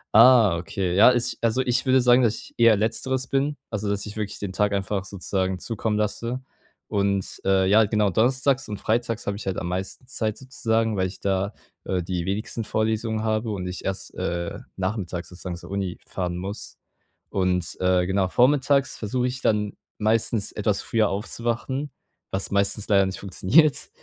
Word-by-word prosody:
Ah 115 -5 +7
okay, 90 +2 -2
ja, 110 +6 +8
ich 120 +1 -1
also, 115 +2 +2
ich 125 +1 0
würde 130 0 +5
sagen, 125 0 +5
dass 115 -3 +2
ich - - -11
eher 115 -2 +6
letzteres 125 +5 -1
bin 140 +2 0
also, 105 -2 -2
dass 100 0 -1
ich 105 - -7
wirklich 105 -2 -4
den 100 -2 -5
Tag 105 +2 +1
einfach 100 0 -2
sozusagen 95 0 -2
zukommen 110 +2 -2
lasse, 115 +4 -2 0.5
und, 100 -1 -1
äh, 95 -1 +3
ja, 105 +3 +6
genau, 105 -1 +1
donnerstags 130 +5 +2
und 105 -1 -5
freitags 115 +1 -1
habe 100 - -1
ich 100 - -8
halt 95 - -1
am 85 - -3
meisten 95 +7 -4
Zeit 110 -4 -1
sozusagen, 115 -4 -1
weil 95 -1 +1
ich 95 - -10
da, 100 0 0 0.3
äh, 90 -2 -1
die 90 0 -2
wenigsten 105 +3 -2
Vorlesungen 110 +1 -1
habe 110 +1 0
und 100 -4 -3
ich 90 0 -5
erst, 95 0 -3
äh, 85 0 -3 0.2
nachmittags 95 -2 -3
sozusagen 90 0 -6
zur 85 - -11
Uni 95 -3 -2
fahren 90 -2 -3
muss. 100 +4 -7 0.5
Und, 90 -3 0
äh, 90 -1 +3
genau 95 0 +1
vormittags 140 +4 +3
versuche 125 +4 -1
ich 125 0 -4
dann 105 -3 +1 0.2
meistens, 110 0 +1
etwas - - -1
früher 110 -3 +1
aufzuwachen, 120 +7 -3 0.4
was 95 0 -2
meistens 100 +1 +1
leider 100 -2 +5
nicht 95 - -5
funktioniert 110 - +3
105 Hz, 175 wpm, -24 LUFS, 95-115 Hz, 0.5 s, ja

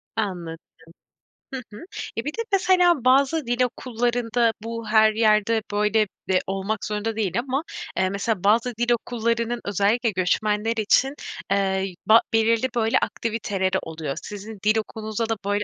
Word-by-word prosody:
Anladım. 175 -6 -3 1.0
Hı 260 - -3
hı. - - -9 0.4
Ya, 230 - -2
bir 295 - -1
de 460 - -3
mesela 360 -7 +3
bazı 275 +4 +3
dil 240 +1 0
okullarında 240 -1 0
bu 230 0 -5
her 215 0 +5
yerde, 220 0 +3
böyle, 210 +1 +2 0.2
eee, 185 -1 +3
olmak 195 +3 -2
zorunda 210 +1 -2
değil 215 -1 0
ama, 265 +4 -2 0.3
eee, 190 0 +2
mesela 200 0 -2
bazı 230 +5 +3
dil 240 +1 +1
okullarının 235 0 -1
özellikle 205 +4 +1
göçmenler 210 +4 0
için, 245 +5 +3 0.4
eee, 190 -1 +1
yü 190 - -9
ba 225 +1 +7
belirli, 225 +3 +3
böyle, 225 -1 +2
aktiviteleri 205 -4 -1
oluyor. 155 -4 -5
Sizin 210 +1 -8
dil 215 +1 +4
okulunuzda 220 +1 -3
da 225 - +1
böyle 205 +1 0
220 Hz, 150 wpm, -24 LUFS, 205-235 Hz, 1.0 s, ba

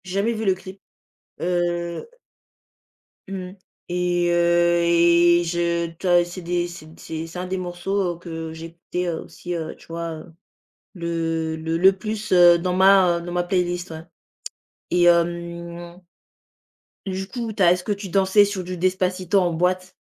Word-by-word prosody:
J'ai 185 - -7
jamais 200 +4 +1
vu 220 0 -4
le 190 - +4
clip, 190 +1 -12 0.6
heu 175 -1 -1 1.2
Mmh 190 -1 -6 0.4
et 175 -1 +1
heu, 175 0 +3
et 170 0 +4
je 170 0 -1
tu 190 - -3
as 175 -1 +5
et - - -2
c'est 175 +2 -8
des 175 0 -1
c'est 175 -2 -10
d - - -17
c'est 160 0 -6
c'est 170 +2 -8
un 180 - -3
des 190 +1 -2
morceaux 180 0 -2
que 165 -2 -7
j'écoutais, 165 +2 -6
heu, 165 -2 -2
aussi, 175 - -7
heu, 160 -2 -4
tu - - -19
vois, 165 0 -5
heu, 160 +2 -12 0.6
le 165 -2 -2
le 160 +1 -2
le 190 +3 +6
plus, 215 +1 -5
heu, 175 -1 +7
dans 180 +1 -1
ma, 190 -2 +5
heu, - - -7
dans 175 +1 -7
ma 175 0 +1
playlist, 175 -1 -1
ouais, 160 0 -8 0.9
et 175 0 +3
hem 170 0 0 1.1
du 190 0 -3
coup, 235 0 -5
tu 200 - +1
as 175 - +6
est-ce 180 0 -4
que 210 - -3
tu 200 -1 -7
dansais 195 +2 +4
sur 200 -2 -4
du 180 +1 -6
Despacito 185 +1 +1
en 180 -2 +1
boîte? 180 +2 0
175 Hz, 175 wpm, -22 LUFS, 170-185 Hz, 1.2 s, heu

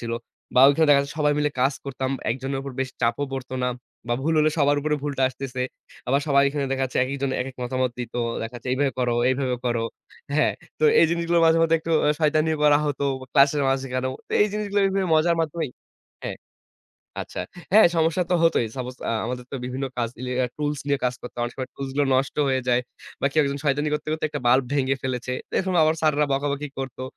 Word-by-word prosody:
ছিল। 115 -1 -4 0.4
বা 125 - +6
ওইখানে 155 +2 +3
দেখাচ্ছে 140 -1 +4
সবাই 150 -1 +3
মিলে 150 0 +1
কাজ 135 +2 +3
করতাম। 130 -1 -3 0.2
একজনের 135 +2 -2
উপর 135 -1 -6
বেশ 130 - -1
চাপও 120 +4 +1
পড়ত 130 -1 -5
না - - +2 0.4
বা 120 - +2
ভুল 160 +2 +1
হলে 155 0 +4
সবার 145 0 +3
উপরে 150 +1 0
ভুলটা 140 -2 -2
আসতেছে। 130 -1 -5 0.5
আবার 140 +2 +3
সবাই 140 0 +5
এখানে 145 0 -2
দেখাচ্ছে 130 -1 -2
একেকজন 135 0 -2
একেক 130 0 -5
মতামত 130 0 0
দিত। 120 -2 -6 0.3
দেখাচ্ছে 120 +2 -7
এইভাবে 135 0 +1
করো, 120 -1 +1
এইভাবে 130 -1 0
করো। 120 -2 0 0.5
হ্যাঁ, - - +3 0.3
তো - - +1 0.2
এই 165 - +6
জিনিসগুলোর 170 0 +1
মাঝে 165 0 +5
মধ্যে 165 0 +4
একটু 165 0 -3 0.3
শয়তানি 155 +1 +2
করা 145 -1 +6
হতো। 140 -1 -1 0.3
ক্লাসের 140 +1 +4
মাঝখানেও। 130 -1 -1 0.2
তে - - -8
এই 210 - +2
জিনিসগুলা 205 -1 0
এইভাবে 195 -1 0
মজার 170 +2 +3
মাধ্যমেই 160 -3 -2 0.5
হ্যাঁ, - - -4 0.8
আচ্ছা - - -6 0.3
হ্যাঁ, 215 -3 +8
সমস্যা 165 +2 +2
তো - - +4
হতই। 165 -8 +3
সাপোজ 125 0 -4 0.2
আ - - 0
আমাদের 125 0 -4
তো - - -2
বিভিন্ন 130 +2 -3
কাজ 120 -2 0
রিলেটেড 125 0 -1
টুলস 150 -1 -2
নিয়ে 140 -1 +1
কাজ 125 - +1
করতাম। 120 0 -7
অনেক 120 - -4
সময় 130 - -4
টুলস 135 -1 -5
গুলো 145 -1 +3
নষ্ট 135 +2 0
হয়ে 130 -1 +1
যায়। 125 0 +4 0.4
বা - - +2
কেউ 155 - +3
একজন 140 0 -2
শয়তানি 145 +1 +1
করতে, 150 0 -2
করতে 155 - -2
একটা 150 - -5
বাল্ব 125 +2 +5
ভেঙে 135 -1 +1
ফেলেছে। 125 -1 -3 0.2
দেখুন, 190 -1 0
আবার 155 +1 +3
স্যাররা 150 -1 +3
বকাবকি 140 +1 -1
করতো। 130 -1 -5
140 Hz, 200 wpm, -24 LUFS, 130-150 Hz, 0.8 s, হ্যাঁ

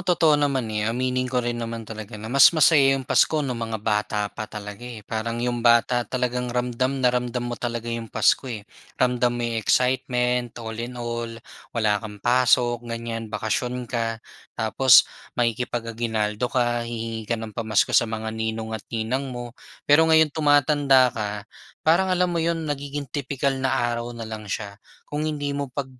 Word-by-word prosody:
totoo 170 -4 +3
naman, 135 -4 +1
eh. 105 - 0
Aminin 125 +2 -1
ko 125 - -2
rin 120 - -1
naman 115 -1 -5
talaga 110 0 -8
na 110 - -7
mas 140 - +9
masaya 150 -3 +6
'yong 130 - -5
Pasko 155 - +3
no'ng 130 - -2
mga 110 - -3
bata 105 0 -1
pa 110 - -6
talaga, 105 0 -8
eh. 110 -4 -9
Parang 115 +1 -3
'yong 120 0 -1
bata 120 +1 +4
talagang 125 -1 -1
ramdam 125 +2 -1
na 125 - +5
ramdam 125 0 -2
mo 120 - -3
talaga 120 -1 -3
'yong 115 -1 -4
Pasko, 130 - +2
eh. 110 -3 -6 0.3
Ramdam 125 -1 +2
mo 120 - -2
'yong 115 -1 -1
excitement 125 -1 +1
all 110 -1 -6
in 125 +1 -6
all 115 -1 -4 0.4
wala 110 -2 +2
kang 105 -2 -8
pasok 120 -1 +3
ganyan 115 -1 -4
bakasyon 120 +4 -2
ka 115 -2 -2 0.4
tapos 120 +3 +6 0.3
makikipag-aguinaldo 115 -2 -1
ka. 120 -1 +1
Hihingi 115 -1 -5
ka 115 - +2
ng 110 -1 -7
pamasko 110 -3 +1
sa - - +6
mga 110 0 -4
ninong 110 0 -3
at 105 - -11
ninang 120 +4 -2
mo. 120 -1 -7 0.3
Pero 145 +2 +6
ngayon 160 -2 +5
tumatanda 145 -4 +4
ka 105 -2 -2 0.6
parang 185 +4 +4
alam 180 0 +2
mo 170 - 0
'yon 165 -1 -1
nagiging 145 -1 -4
tipikal 140 +1 -2
na 130 0 -1
araw 120 0 -1
na 115 - -5
lang 110 -2 -7
siya. 100 0 -4 0.3
Kung 150 +1 -3
hindi 145 -1 -3
mo 140 -2 -3
pag 135 +1 -3
120 Hz, 175 wpm, -24 LUFS, 115-130 Hz, 0.6 s, mas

